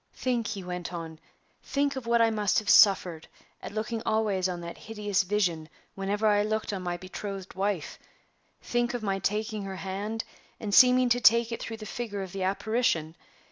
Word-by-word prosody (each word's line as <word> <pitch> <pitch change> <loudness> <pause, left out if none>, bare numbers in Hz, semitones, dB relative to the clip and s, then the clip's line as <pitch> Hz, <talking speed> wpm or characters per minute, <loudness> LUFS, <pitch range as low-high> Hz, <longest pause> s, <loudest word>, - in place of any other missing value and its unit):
"Think," 240 -4 -1
he 195 -2 -4
went 180 -1 -5
on, 165 -2 -7 0.4
"think 280 0 -1
of 260 -3 -6
what 235 0 +4
I 225 - +3
must 210 -2 +1
have 210 -1 +2
suffered 180 -5 +5 0.3
at - - -7
looking 220 +2 -3
always 205 -4 +1
on 175 -1 -4
that 170 0 -7
hideous 210 -2 -1
vision 180 -5 -1 0.2
whenever 200 +2 -2
I 205 -1 +4
looked 215 0 -1
on 190 - -3
my 175 -1 -3
betrothed 195 +1 -7
wife! 195 -3 -2 0.6
Think 240 0 0
of 240 - -4
my 195 -2 0
taking 210 +2 -1
her 190 -1 -5
hand, 200 +4 -4 0.4
and 205 -2 -4
seeming 250 +2 +7
to 245 +1 +2
take 235 +1 +5
it 230 - -4
through 225 - -5
the 215 - -9
figure 210 -3 -4
of 190 - -8
the 195 - -5
apparition! 195 -4 0
205 Hz, 185 wpm, -28 LUFS, 190-225 Hz, 0.6 s, seeming